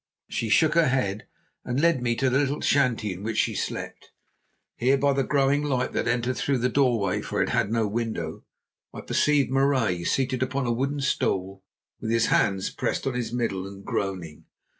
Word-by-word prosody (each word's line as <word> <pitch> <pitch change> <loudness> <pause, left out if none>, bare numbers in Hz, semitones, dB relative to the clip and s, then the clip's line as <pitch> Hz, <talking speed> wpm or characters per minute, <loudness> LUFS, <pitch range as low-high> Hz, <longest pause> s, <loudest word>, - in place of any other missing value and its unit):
She 115 - -2
shook 155 +7 +4
her 170 -1 +4
head, 110 -6 -1 0.4
and 125 +2 -2
led 165 -4 +3
me 120 -1 0
to 135 - +1
the 135 - +3
little 145 0 -1
shanty 120 -7 +1
in 90 - -10
which 110 +1 -3
she - - +2
slept. - - -5 0.7
Here 130 +3 +3
by 140 +1 +2
the 135 0 +1
growing 140 0 +2
light, 135 -4 -1
that - - -1
entered 120 +1 0
through 140 -2 0
the 125 +1 +1
doorway 120 -8 +1
for - - -3
it - - +1
had 100 - 0
no 115 -2 +1
window, 105 -7 -3 0.5
I - - -6
perceived 145 -3 +2
Marais 130 -10 +1
seated 130 -1 0
upon 130 +1 -1
a 120 - 0
wooden 140 +4 -1
stool 95 -7 -1 0.4
with 110 - -4
his 115 0 +3
hands 95 -1 +1
pressed - - -2
on 135 - 0
his 125 -1 -3
middle 115 -6 -2
and 100 0 -11
groaning. 90 -6 -4
125 Hz, 190 wpm, -25 LUFS, 105-135 Hz, 0.7 s, shook